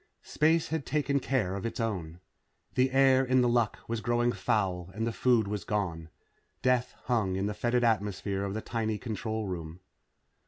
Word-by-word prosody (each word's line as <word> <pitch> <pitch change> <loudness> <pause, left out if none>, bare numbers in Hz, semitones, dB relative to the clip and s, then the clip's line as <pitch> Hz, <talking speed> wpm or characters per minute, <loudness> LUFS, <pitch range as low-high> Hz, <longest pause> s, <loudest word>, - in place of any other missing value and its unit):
Space 160 +1 +2
had 160 -2 -1
taken 145 -1 0
care 125 -8 0
of 100 - -5
its 115 +2 -4
own. 90 -7 -3 0.5
The 130 +1 +3
air 135 0 +5
in 130 0 +3
The 125 - +3
Luck 120 -2 +2
was 115 -1 -2
growing 120 +1 +2
foul 95 -3 -1
and 110 +1 -1
the 115 - 0
food 120 -3 +3
was 105 -2 -3
gone. 85 -6 -2 0.5
Death 125 -1 +2
hung 110 -7 0
in 95 +1 -1
the 105 - -1
fetid 120 +3 +1
atmosphere 100 -3 0
of 100 0 -3
the 110 - -2
tiny 110 -2 -2
control 110 -1 -3
room. 85 -3 -5
110 Hz, 180 wpm, -29 LUFS, 100-125 Hz, 0.5 s, air